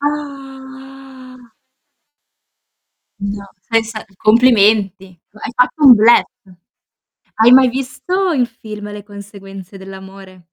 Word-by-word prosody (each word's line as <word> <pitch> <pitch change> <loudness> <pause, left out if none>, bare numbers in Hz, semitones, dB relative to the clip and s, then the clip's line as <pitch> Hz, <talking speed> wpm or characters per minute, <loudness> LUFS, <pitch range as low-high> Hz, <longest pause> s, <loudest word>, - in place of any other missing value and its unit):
Ah. 270 -3 -9 1.7
No, 200 0 -6 0.3
sei 225 0 +3
sta 220 -1 -8
complimenti. 215 -4 +2 0.2
Hai 215 +3 -9
fatto 260 +4 0
un 255 - +9
bluff. 225 +2 +4 1.1
Hai 225 +2 +4
mai 260 0 +6
visto 270 +9 -3
il 255 -5 0
film 210 -3 -10
"Le 205 0 -9
conseguenze 200 -2 -13
dell'amore"? 190 0 -13
225 Hz, 95 wpm, -16 LUFS, 200-265 Hz, 1.7 s, un